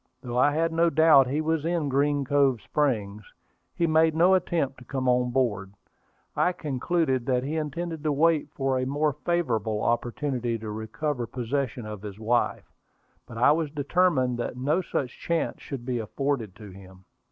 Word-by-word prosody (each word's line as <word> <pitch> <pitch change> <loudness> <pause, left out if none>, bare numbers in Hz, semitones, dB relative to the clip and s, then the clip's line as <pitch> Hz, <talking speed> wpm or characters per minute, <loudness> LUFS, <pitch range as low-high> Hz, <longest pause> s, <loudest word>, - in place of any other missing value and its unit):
Though 125 -1 -2
I 145 +3 +4
had 165 +2 0
no 170 +1 +3
doubt 155 -4 +6
he 145 +4 -1
was 160 -1 0
in 165 -2 0
Green 140 +1 +1
Cove 135 -3 +2
Springs, 105 -5 -1 0.5
he 170 - +1
made 160 0 +3
no 175 +4 +5
attempt 165 -8 0
to - - -13
come 130 0 -3
on 125 0 +2
board. 105 -7 -1 0.6
I 180 - +2
concluded 145 -3 -1
that 125 -1 +1
he 145 +4 -3
intended 160 +1 -3
to 150 - +2
wait 155 +2 +2
for 135 -1 0
a 130 - -1
more 145 +2 0
favorable 115 -12 -1
opportunity 120 0 -1
to 110 -1 -6
recover 120 +4 -3
possession 125 0 -3
of 105 -2 -7
his 105 -2 -8
wife; 115 +3 -1 0.5
but 115 - -9
I 125 +5 +5
was 155 0 0
determined 145 -4 +1
that 120 - -4
no 145 +8 +1
such 135 -7 -4
chance 170 -1 -2
should 130 -4 -7
be 125 -2 -1
afforded 115 -2 -2
to 105 -2 -11
him. 95 0 -15
135 Hz, 175 wpm, -26 LUFS, 120-155 Hz, 0.6 s, doubt